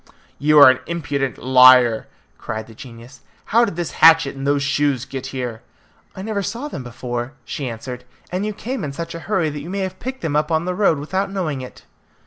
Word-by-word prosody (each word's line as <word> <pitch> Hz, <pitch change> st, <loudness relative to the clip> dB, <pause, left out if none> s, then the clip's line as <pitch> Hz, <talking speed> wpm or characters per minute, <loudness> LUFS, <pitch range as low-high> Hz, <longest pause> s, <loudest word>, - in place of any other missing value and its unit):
"You 150 Hz, +1 st, +3 dB
are 145 Hz, -3 st, +10 dB
an 130 Hz, -, -3 dB
impudent 140 Hz, -5 st, -2 dB
liar!" 125 Hz, -2 st, +6 dB, 0.3 s
cried 110 Hz, 0 st, -5 dB
the 115 Hz, -, -14 dB
genius. 120 Hz, +2 st, -13 dB, 0.2 s
"How 235 Hz, +3 st, +3 dB
did 200 Hz, -, -5 dB
this 175 Hz, -1 st, -3 dB
hatchet 160 Hz, -3 st, +6 dB
and 135 Hz, 0 st, -5 dB
those 145 Hz, 0 st, +2 dB
shoes 140 Hz, -2 st, 0 dB
get 135 Hz, -1 st, -6 dB
here?" 125 Hz, -4 st, -5 dB, 0.5 s
"I 190 Hz, -, -7 dB
never 210 Hz, -1 st, -2 dB
saw 235 Hz, +9 st, -4 dB
them 145 Hz, -, -6 dB
before," 120 Hz, +1 st, -5 dB
she 135 Hz, +2 st, -4 dB
answered, 125 Hz, +2 st, -7 dB, 0.3 s
"and 185 Hz, +2 st, -2 dB
you 215 Hz, -, -2 dB
came 245 Hz, +4 st, -5 dB
in 140 Hz, -2 st, -4 dB
such 165 Hz, +2 st, -6 dB
a 165 Hz, -, -6 dB
hurry 175 Hz, -7 st, +1 dB
that 145 Hz, 0 st, -6 dB
you 160 Hz, -, -8 dB
may 195 Hz, +1 st, -3 dB
have 185 Hz, 0 st, -4 dB
picked 260 Hz, +1 st, -6 dB
them 155 Hz, -3 st, -2 dB
up 150 Hz, +2 st, +1 dB
on 160 Hz, +1 st, +1 dB
the 180 Hz, -, -1 dB
road 180 Hz, -5 st, +2 dB
without 190 Hz, +8 st, -2 dB
knowing 165 Hz, -9 st, -3 dB
it." 125 Hz, -, -11 dB
145 Hz, 215 wpm, -20 LUFS, 130-180 Hz, 0.5 s, are